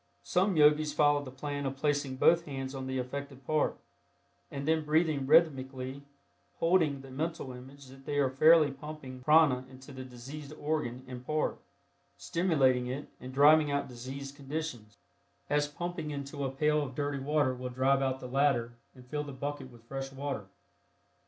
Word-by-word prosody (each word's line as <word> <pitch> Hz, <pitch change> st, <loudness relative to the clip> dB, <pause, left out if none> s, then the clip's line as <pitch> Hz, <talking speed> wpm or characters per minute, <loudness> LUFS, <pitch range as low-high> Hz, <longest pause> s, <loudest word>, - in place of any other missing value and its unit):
Some 185 Hz, 0 st, +1 dB
Yogis 150 Hz, 0 st, +5 dB
follow 145 Hz, -1 st, +3 dB
the 135 Hz, -, -8 dB
plan 145 Hz, +2 st, -4 dB
of 135 Hz, -, -3 dB
placing 145 Hz, -2 st, 0 dB
both 165 Hz, +5 st, +4 dB
hands 135 Hz, -2 st, -5 dB
on 130 Hz, -1 st, -5 dB
the 130 Hz, 0 st, -2 dB
affected 135 Hz, +1 st, -5 dB
part, 155 Hz, +2 st, +1 dB, 0.7 s
and 140 Hz, +1 st, -5 dB
then 160 Hz, 0 st, +2 dB
breathing 150 Hz, -2 st, +1 dB
rhythmically, 135 Hz, -4 st, +2 dB, 0.6 s
holding 165 Hz, -5 st, +2 dB
the 135 Hz, -1 st, -12 dB
mental 155 Hz, 0 st, -3 dB
image 135 Hz, +3 st, -12 dB
that 135 Hz, +1 st, -15 dB
they 145 Hz, -, -1 dB
are 135 Hz, -2 st, +2 dB
fairly 155 Hz, +2 st, +6 dB
pumping 135 Hz, -2 st, -9 dB
prana 150 Hz, -3 st, +5 dB
into 130 Hz, 0 st, -13 dB
the 130 Hz, -1 st, -7 dB
diseased 135 Hz, +4 st, -9 dB
organ 145 Hz, -5 st, -3 dB
and 125 Hz, -1 st, -8 dB
part, 155 Hz, +3 st, -1 dB, 0.6 s
stimulating 135 Hz, -8 st, +2 dB
it 135 Hz, +4 st, -5 dB
and 130 Hz, +1 st, -8 dB
driving 150 Hz, +3 st, +6 dB
out 140 Hz, 0 st, -1 dB
diseased 135 Hz, +3 st, -7 dB
conditions, 135 Hz, -, -5 dB, 0.5 s
as 145 Hz, 0 st, +2 dB
pumping 175 Hz, +1 st, -5 dB
into 140 Hz, 0 st, -5 dB
a -, -, 0 dB
pail 150 Hz, +2 st, +2 dB
of 135 Hz, -3 st, -5 dB
dirty 145 Hz, -1 st, -2 dB
water 145 Hz, -1 st, +1 dB
will 125 Hz, 0 st, -5 dB
drive 135 Hz, +2 st, +2 dB
out 130 Hz, -1 st, 0 dB
the 125 Hz, -, -7 dB
latter 125 Hz, -3 st, +1 dB, 0.2 s
and 125 Hz, -1 st, -14 dB
fill 150 Hz, +3 st, -3 dB
the 145 Hz, -, -7 dB
bucket 140 Hz, 0 st, -5 dB
with 120 Hz, -2 st, -17 dB
fresh 135 Hz, +2 st, -5 dB
water. 135 Hz, -7 st, -4 dB
140 Hz, 170 wpm, -31 LUFS, 130-150 Hz, 0.7 s, fairly